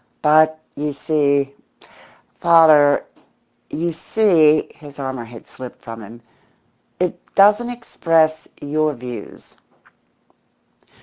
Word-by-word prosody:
"But, 155 +1 +4 0.2
you 150 0 -4
see, 140 -2 0 0.9
father 155 -4 +5 0.6
you 170 +2 -3
see" 160 -6 +2
his 145 -3 -14
armour 130 -3 -5
had 115 0 -13
slipped 125 -1 -12
from 115 -2 -9
him 115 +3 -13 0.8
"it 180 0 -2
doesn't 210 +4 +4
express 165 -9 0
your 155 +1 -1
views." 120 -3 -10
150 Hz, 95 wpm, -19 LUFS, 135-165 Hz, 0.9 s, father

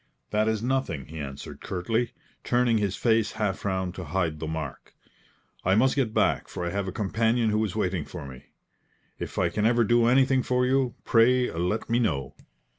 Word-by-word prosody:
"That 105 +1 +2
is 110 0 0
nothing," 125 - -1
he 80 +1 -9
answered, 70 -2 -7
curtly, 110 +6 -1 0.3
turning 120 -2 +2
his 100 -2 -1
face 115 -2 +2
half 105 -3 -2
round 95 -2 -1
to 95 - -6
hide 80 -1 -1
the 80 - -4
mark. 80 -4 -6 0.7
"I 95 +1 +3
must 130 +5 +3
get 130 -6 +1
back, - - +1
for 90 - -5
I 85 - -2
have 100 -1 -2
a - - -2
companion 110 +3 +1
who 105 +1 +1
is 105 -3 -3
waiting 90 -6 -1
for 85 -5 -8
me. 65 -2 -11 0.7
If - - -6
I - - +2
can 105 +1 +1
ever 120 0 +3
do 120 +1 +3
anything 130 +1 +4
for 125 0 +1
you, 130 -1 +1
pray 125 +2 +4
let 90 +6 -2
me 115 +1 +2
know. 70 - -1
110 Hz, 190 wpm, -26 LUFS, 90-120 Hz, 0.7 s, anything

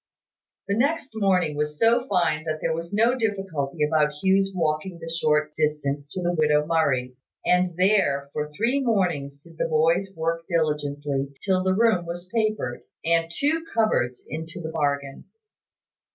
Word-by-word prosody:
The 200 - +1
next 280 +4 0
morning 185 -7 +1
was 150 0 -2
so 235 - +3
fine 170 -6 +1
that 155 -1 -2
there - - 0
was 165 +1 -5
no 225 +4 +3
difficulty 195 - -2
about 150 -1 +2
Hugh's 195 +1 +3
walking 165 +1 -1
the 165 0 -7
short 150 -2 +1
distance 145 -2 -1
to 180 +4 -5
the 175 0 +1
widow 150 -2 +3
Murray's; 140 -6 +1 0.3
and 180 -1 +2
there, 180 -8 +2
for 150 0 -3
three 235 - +1
mornings, 175 - 0
did 165 +2 -18
the - - +1
boys 165 +5 +2
work 165 +1 -1
diligently, 145 -4 -1
till 190 -2 +2
the 185 0 +2
room 215 -6 +2
was 175 +1 -6
papered, 215 - -1 0.2
and 165 0 +2
two 305 - 0
cupboards 130 - +1
into 160 +4 -6
the 160 -2 -5
bargain. 140 -3 -2
165 Hz, 155 wpm, -25 LUFS, 150-195 Hz, 0.3 s, so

